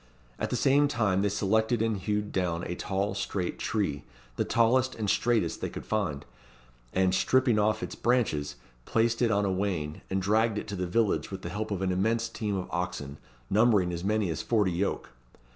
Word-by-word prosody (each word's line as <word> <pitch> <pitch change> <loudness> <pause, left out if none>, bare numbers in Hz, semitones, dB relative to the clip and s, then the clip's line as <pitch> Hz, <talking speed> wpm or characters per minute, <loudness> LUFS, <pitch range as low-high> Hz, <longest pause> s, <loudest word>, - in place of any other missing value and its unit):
At - - -1
the - - -1
same 145 +2 +4
time 110 -9 +1
they 100 - +2
selected 110 +4 +1
and 115 -1 +1
hewed 105 +2 -2
down 90 -2 -1
a - - -3
tall, 95 +2 -2
straight 95 -2 -3
tree 80 -9 -1 0.3
the - - +1
tallest 125 +3 +2
and 110 -2 -3
straightest 110 -5 +1
they - - -2
could - - -8
find; 85 -10 -2 0.7
and, 95 0 +2
stripping 125 +3 +3
off 110 +2 +1
its - - -5
branches, 115 - 0 0.3
placed 115 +1 +1
it 120 - +4
on 100 -1 +2
a 95 - +1
wain, 90 -6 -2
and 95 - 0
dragged 110 +3 +2
it 105 - -4
to 100 - -3
the 90 -1 -2
village 105 +3 +1
with 95 -1 -7
the 85 - -4
help 105 +4 -3
of 95 -2 -2
an 95 - +1
immense 110 +5 +1
team 105 -3 -3
of 90 - -4
oxen, 80 -6 -4 0.3
numbering 105 - +3
as 85 0 -4
many 105 -2 +1
as - - -3
forty 105 -5 +1
yoke. 90 +4 -2
100 Hz, 195 wpm, -28 LUFS, 90-110 Hz, 0.7 s, same